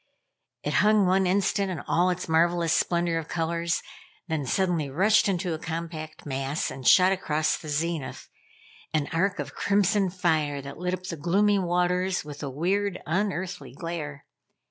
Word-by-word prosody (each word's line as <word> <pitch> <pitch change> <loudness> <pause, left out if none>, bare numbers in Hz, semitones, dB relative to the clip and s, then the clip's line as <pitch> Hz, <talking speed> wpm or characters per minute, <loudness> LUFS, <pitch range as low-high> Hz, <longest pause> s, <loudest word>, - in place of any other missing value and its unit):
It - - -2
hung 210 -1 +4
one 185 +1 +3
instant 195 +1 +1
in 180 -4 -3
all 180 +2 +2
its 180 0 -2
marvelous 165 0 +2
splendor 170 0 +1
of 160 - -7
colors, 170 0 -1 0.4
then 155 -5 -2
suddenly 175 -2 0
rushed 200 +9 +3
into 180 -2 -1
a 160 - -4
compact 160 -1 -6
mass, 135 +1 -2
and 130 -1 -5
shot 185 0 +7
across 155 -5 0
the 155 - -9
zenith, 155 -1 -3 0.7
an 150 -2 0
arc 190 +4 +1
of - - -5
crimson 200 -1 +2
fire 160 -5 0
that 140 +2 -8
lit 180 +1 -1
up 185 - -14
the 175 -3 -5
gloomy 200 +6 +2
waters 180 0 0
with 145 -1 -8
a 140 - -3
weird, 185 +7 -1
unearthly 180 -6 -2
glare. 150 -2 -6
170 Hz, 160 wpm, -26 LUFS, 155-185 Hz, 0.7 s, shot